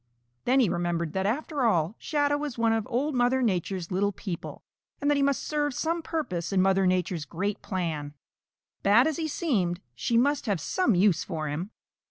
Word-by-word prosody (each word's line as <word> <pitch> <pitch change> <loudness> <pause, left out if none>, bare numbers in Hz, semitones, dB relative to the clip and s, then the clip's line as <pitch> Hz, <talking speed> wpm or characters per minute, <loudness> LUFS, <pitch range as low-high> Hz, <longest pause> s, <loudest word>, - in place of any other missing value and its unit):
Then 260 +2 +4
he 245 - +4
remembered 170 -2 -1
that 190 0 0
after 285 +5 -2
all 175 -6 +2
Shadow 290 -1 +1
was 290 -5 -4
one 230 -1 +3
of 225 -2 -1
Old 285 +6 0
Mother 250 +1 +2
Nature's 185 -4 -1
little 200 +2 +1
people, 185 -4 -6 0.4
and 290 +1 +1
that - - +3
he 280 - +1
must 275 -1 +1
serve 295 -3 -1
some 330 +4 -1
purpose 245 - -3
in 195 - +2
Mother 190 0 +3
Nature's 180 -3 0
great 195 +7 -3
plan. 155 -6 -3 0.7
Bad 215 +6 +5
as 315 -3 0
he 320 - -1
seemed, 200 - 0
she 230 - 0
must 280 +2 +2
have 200 -5 +1
some 365 - +1
use 180 -2 +3
for 155 -2 -4
him. 165 +7 -3
205 Hz, 190 wpm, -27 LUFS, 175-275 Hz, 0.7 s, Bad